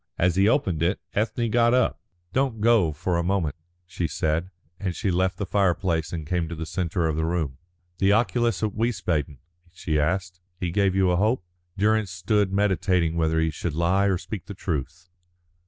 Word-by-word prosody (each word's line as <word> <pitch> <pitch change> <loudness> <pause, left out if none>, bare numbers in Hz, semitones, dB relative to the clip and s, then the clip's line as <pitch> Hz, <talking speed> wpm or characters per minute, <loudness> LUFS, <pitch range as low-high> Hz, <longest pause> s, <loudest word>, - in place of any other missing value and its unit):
As 90 0 +2
he 100 +3 +4
opened 95 - +1
it, 90 +4 +1
Ethne 115 +2 0
got 120 +1 +4
up. 125 - +1 0.3
"Don't 130 -4 0
go 110 -7 +4
for 85 +3 -1
a - - 0
moment," 90 -5 0 0.3
she 85 -1 -3
said, 80 +4 -1 0.3
and 95 -4 -3
she 95 - -1
left 90 +1 +1
the 100 - -2
fireplace 90 -5 +1
and 80 -3 -4
came 85 0 -1
to 85 - -5
the 80 0 -5
centre 85 0 -1
of 80 - -1
the 80 - -1
room. 80 -5 -2 0.4
"The 95 +1 +4
oculist 115 +2 +1
at 105 -2 0
Wiesbaden?" 90 - -1 0.3
she 80 -3 -1
asked. 90 +3 -1 0.2
"He 90 -2 -2
gave 95 0 +2
you 95 -2 +3
a 90 - +2
hope?" 110 +2 +1 0.3
Durrance 110 0 +2
stood 95 +3 0
meditating 95 -4 +1
whether 80 -1 +1
he 80 0 +1
should 75 +1 -4
lie 90 +4 +2
or 95 -2 +2
speak 90 +1 -7
the 100 - -7
truth. 85 +1 -4
90 Hz, 190 wpm, -25 LUFS, 85-100 Hz, 0.4 s, he